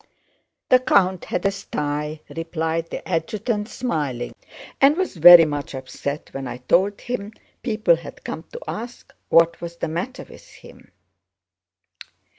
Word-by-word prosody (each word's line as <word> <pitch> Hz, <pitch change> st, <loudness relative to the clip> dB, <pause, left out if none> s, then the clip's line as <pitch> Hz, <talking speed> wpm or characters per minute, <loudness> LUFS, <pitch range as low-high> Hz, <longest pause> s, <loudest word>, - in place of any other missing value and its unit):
"The 255 Hz, -, +7 dB
count 190 Hz, -7 st, +2 dB
had -, -, -3 dB
a 195 Hz, -, +3 dB
sty," 150 Hz, -5 st, -4 dB
replied 165 Hz, 0 st, -2 dB
the -, -, -7 dB
adjutant 210 Hz, +6 st, -2 dB
smiling, 145 Hz, -, -3 dB, 0.5 s
"and 280 Hz, +3 st, +6 dB
was 375 Hz, -, -1 dB
very 170 Hz, 0 st, +10 dB
much 145 Hz, -2 st, -4 dB
upset 135 Hz, +3 st, -6 dB
when 135 Hz, -1 st, -5 dB
I 125 Hz, -, -6 dB
told 185 Hz, +11 st, +1 dB
him 225 Hz, -4 st, -5 dB, 0.3 s
people 215 Hz, -7 st, +2 dB
had 165 Hz, -, -11 dB
come 160 Hz, -, -6 dB
to -, -, -7 dB
ask 235 Hz, +2 st, -7 dB, 0.2 s
what 165 Hz, 0 st, +4 dB
was 170 Hz, 0 st, -6 dB
the 170 Hz, -, -3 dB
matter 175 Hz, +11 st, -4 dB
with -, -, -15 dB
him. -, -, -16 dB
170 Hz, 140 wpm, -22 LUFS, 150-210 Hz, 0.5 s, very